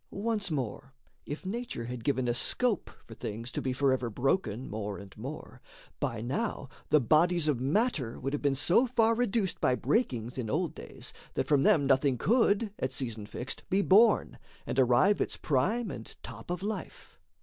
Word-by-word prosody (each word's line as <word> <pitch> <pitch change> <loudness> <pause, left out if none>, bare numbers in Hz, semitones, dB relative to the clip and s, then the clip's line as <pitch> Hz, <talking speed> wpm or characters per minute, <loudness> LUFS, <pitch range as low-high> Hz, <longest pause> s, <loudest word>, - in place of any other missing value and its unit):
Once 210 -1 -2
more, 135 -2 -4 0.3
if 145 +5 -6
nature 230 - -4
had 125 -1 -6
given 130 -1 0
a 120 - +2
scope 230 - 0 0.2
for 115 - -11
things 115 +3 -6
To - - -3
be 130 - -1
forever 130 -2 +1
broken 125 - -1
more 105 -2 -4
and 100 -1 -12
more, 135 +8 -8 0.4
By 115 -2 -2
now 135 - -3 0.2
the 150 - +5
bodies 160 +5 +3
of 145 -5 +1
matter 140 - 0
would 135 +2 -3
have 145 - -2
been 140 -2 +2
So 175 - +4
far 230 -2 +3
reduced 225 -4 0
by 125 - +3
breakings 125 - -1
in 115 -4 -3
old 160 +5 0
days - - -8 0.2
That - - 0
from 145 -2 +3
them 145 0 +4
nothing 135 -1 +3
could, 215 - +2
at 130 - -1
season 115 -6 -3
fixed, 125 +4 -4
Be 195 +1 +2
born, 215 +4 +4 0.3
and 135 - -1
arrive 130 +11 +4
its - - -1
prime 195 - 0
and 110 - -8
top 115 +2 -9
of 180 +1 -3
life. 210 +1 -6
140 Hz, 180 wpm, -30 LUFS, 125-200 Hz, 0.4 s, the